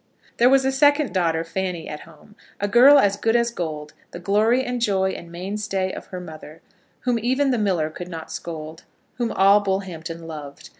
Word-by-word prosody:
There 240 +2 +5
was 270 0 +4
a 265 - +2
second 290 +1 +3
daughter, 165 -3 +1
Fanny, 180 0 -4
at 150 - -6
home, 165 +5 -17 0.3
a 205 - 0
girl 255 +7 +7
as 200 -6 +3
good 225 +2 +1
as 235 0 +2
gold, 155 -7 -5 0.2
the - - -9
glory 215 +8 +2
and 245 -1 -3
joy 190 -4 +1
and 170 -2 -9
mainstay 190 +1 -3
of - - -8
her 185 - -7
mother, 155 -2 -11 0.4
whom 245 -2 0
even 260 +4 +1
the 245 - 0
miller 180 -7 0
could 180 +3 -8
not 165 -2 -8
scold, 160 -1 -7 0.4
whom 235 -2 0
all 195 +2 +5
Bullhampton 175 -5 -4
loved. 150 -3 -9
190 Hz, 190 wpm, -22 LUFS, 165-235 Hz, 0.4 s, girl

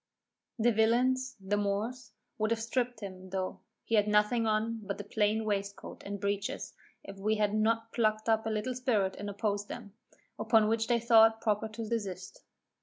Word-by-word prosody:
The 240 +1 +3
villains, 255 +4 +2
(the 195 +2 -1
Moors), 215 +4 -2 0.3
would 215 0 +1
have 225 -1 0
stripped 245 0 -1
him, 185 -2 -8
though, 185 0 -3 0.2
he - - -6
had 210 -1 +4
nothing 210 +2 +3
on 220 +1 0
but 200 -1 -5
a - - -4
plain 215 +1 0
waistcoat 200 -1 -3
and 200 0 -5
breeches, 200 0 -2 0.3
if 195 0 -10
we 215 +2 +1
had 210 -1 +1
not 225 +1 +1
plucked 215 -2 +1
up 220 0 +2
a - - 0
little 220 +4 -1
spirit 230 -7 0
and 205 - -4
opposed 205 0 -2
them; 215 -5 -8 0.5
upon 220 -1 +4
which 225 0 +1
they 240 -1 +3
thought 225 -1 +6
proper 215 0 0
to 220 +1 -6
desist. 195 -5 -4
215 Hz, 180 wpm, -31 LUFS, 205-230 Hz, 0.5 s, thought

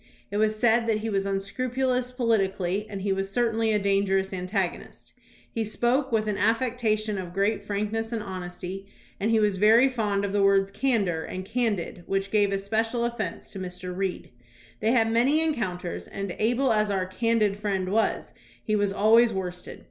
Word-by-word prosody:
It 205 - -2
was 215 0 +2
said 230 0 +3
that 215 -1 +1
he 225 0 -3
was 195 -1 0
un 195 0 0
scrupulous 250 +4 -1
politically, 205 -5 0
and 195 -2 -6
he 200 -1 +1
was 195 0 -2
certainly 225 0 +1
a 210 - +3
danger 195 -1 +2
ous 190 0 -2
antagonist. 185 0 -4 0.4
He 225 - -1
spoke 240 +6 0
with 220 -1 +1
an 210 -2 -1
affectation 220 -2 0
of 180 -1 -7
great 200 +1 +1
frankness 215 +2 -2
and 225 -2 -2
honesty, 185 +1 -6 0.3
and 210 - 0
he 225 -1 +4
was 205 -3 +2
very 220 +6 +6
fond 210 -6 -1
of 200 - -4
the 205 - +2
words 195 0 +3
"candor" 200 -11 0
and 185 0 -6
"candid," 215 -6 -2
which 195 0 -1
gave 205 -2 +3
especial 220 +4 0
offence 235 0 -4
to 195 - -7
Mr. 180 0 -6
Reed. 190 -1 -3 0.5
They 220 - +1
had 225 -2 +3
many 255 +7 +3
encounters, 205 - -2
and, 195 -2 -5
able 240 +3 +2
as 210 -1 +1
our 190 -2 0
"candid" 215 +1 +1
friend 195 -3 -2
was, 220 +3 0 0.3
he 215 - 0
was 205 -1 +1
always 225 +4 +5
worst 180 -3 -5
ed. - - -9
210 Hz, 185 wpm, -26 LUFS, 195-230 Hz, 0.5 s, very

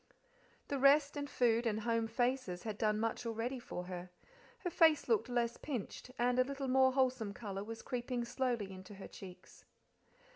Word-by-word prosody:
The 280 - -1
rest 285 +2 +5
and 285 0 -3
food 235 -2 +2
and 220 0 0
home 230 0 +1
faces 240 -6 -1
had 215 -2 -4
done 215 -1 +2
much 225 +1 -1
already 230 +3 -2
for 180 -6 -6
her; 180 0 -6 0.5
her 355 - -1
face 320 -2 +5
looked 440 - +2
less 235 -1 0
pinched, 250 -3 -5
and 245 +1 +2
a - - +7
little 275 +1 -4
more 260 0 +5
wholesome 255 -6 +1
colour 200 -3 -5
was 225 +1 -7
creeping 245 -1 -2
slowly 235 -5 -1
into 190 +2 -10
her 195 - -9
cheeks. 185 -2 -12
240 Hz, 175 wpm, -35 LUFS, 215-260 Hz, 0.5 s, a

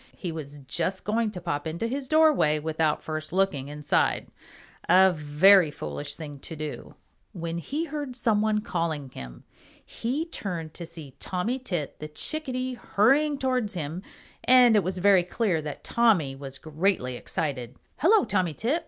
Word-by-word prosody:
He 175 - -4
was 145 -3 -7
just 170 +7 -2
going 220 +1 0
to 200 -4 -7
pop 145 -2 -3
into 170 +7 -3
his 265 +3 -3
doorway 310 - +4
without 155 0 0
first 155 0 -5
looking 185 -7 0
inside, 150 0 0 0.6
a 185 +1 +6
very 155 +4 +5
foolish 75 - -5
thing 145 -3 -8
to 160 - -7
do, 155 -1 -7 0.4
when 170 -1 -4
he 295 - -3
heard 290 -5 -5
some 225 -4 +2
one 215 0 +1
calling 160 -8 -3
him. 60 - -9 0.4
He 270 +8 -3
turned 175 - -5
to 170 - -7
see 150 -6 -11
Tommy 215 +8 -2
Tit 175 - -4
the 155 - -5
Chickadee 255 - -3
hurrying 270 +7 +2
towards 255 -6 -1
him, 160 +2 -4 0.4
and 250 -3 +6
it 205 - +4
was 185 +1 -3
very 190 0 +5
clear 180 -1 0
that 150 -1 -7
Tommy 195 -13 +2
was 135 -1 -7
greatly 155 -5 -1
excited. 130 -5 -3 0.2
"Hello, 400 +6 +5
Tommy 180 -6 0
Tit! 260 - 0
180 Hz, 160 wpm, -26 LUFS, 150-230 Hz, 0.6 s, a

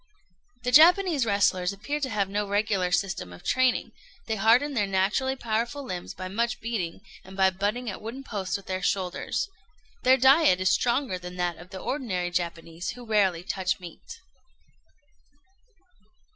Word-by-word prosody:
The 250 - 0
Japanese 325 -2 +6
wrestlers 185 -3 +2
appear 245 +10 -4
to 275 -3 -2
have 205 -4 0
no 205 +1 -2
regular 200 -3 0
system 180 - -1
of 90 - -12
training; 255 -1 +1 0.3
they 220 - -1
harden 235 +8 +3
their 210 -6 +1
naturally 200 +8 +1
powerful 235 +3 -2
limbs 180 -8 -6
by 185 0 -6
much 230 +5 -1
beating, 210 -7 -4 0.2
and 190 +1 -12
by 190 -1 +4
butting 205 +6 -2
at 205 - -5
wooden 235 +5 -7
posts 200 -7 -3
with 200 - -14
their 185 0 -3
shoulders. 185 -3 -1 0.5
Their 260 +1 +5
diet 265 - +5
is 185 0 +2
stronger 240 -5 +1
than 180 0 -8
that 175 -2 -1
of 175 +2 -13
the 190 - -8
ordinary 185 -9 -2
Japanese, 170 0 -3
who 245 -1 -11
rarely 195 -6 +2
touch 185 0 -1
meat. 175 - -11
200 Hz, 160 wpm, -26 LUFS, 185-245 Hz, 0.5 s, Japanese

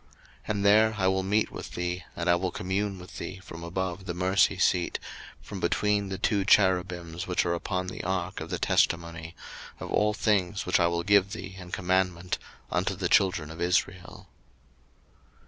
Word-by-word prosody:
02:025:022 - - -31 0.4
And 100 -1 0
there 110 +2 +5
I 95 -2 +2
will 95 0 +2
meet 105 +3 +1
with - - -8
thee, 90 +1 -3
and 85 - -3
I 85 - +6
will 90 +1 0
commune 95 +2 -2
with 90 0 -10
thee 95 - -5
from 85 -1 -9
above 95 +2 -3
the 85 - -3
mercy 95 +1 +3
seat, 90 -1 +2 0.4
from - - -8
between 105 -1 +1
the 95 - -3
two 100 +1 +1
cherubims 90 -3 +2
which 90 -1 +1
are 85 - +1
upon 90 +2 -2
the 90 - -6
ark 95 +1 -2
of - - -6
the - - -2
testimony, 85 0 0 0.4
of - - -6
all 105 0 +2
things 100 -4 +1
which - - +2
I 85 - +4
will 85 0 -1
give 100 +1 +4
thee 95 -3 -7
in 90 -2 -10
commandment 90 -1 0 0.3
unto 95 +2 0
the 90 -1 -2
children 90 -6 +3
of 80 +1 -9
Israel. 90 +1 -1
95 Hz, 180 wpm, -28 LUFS, 90-100 Hz, 0.4 s, I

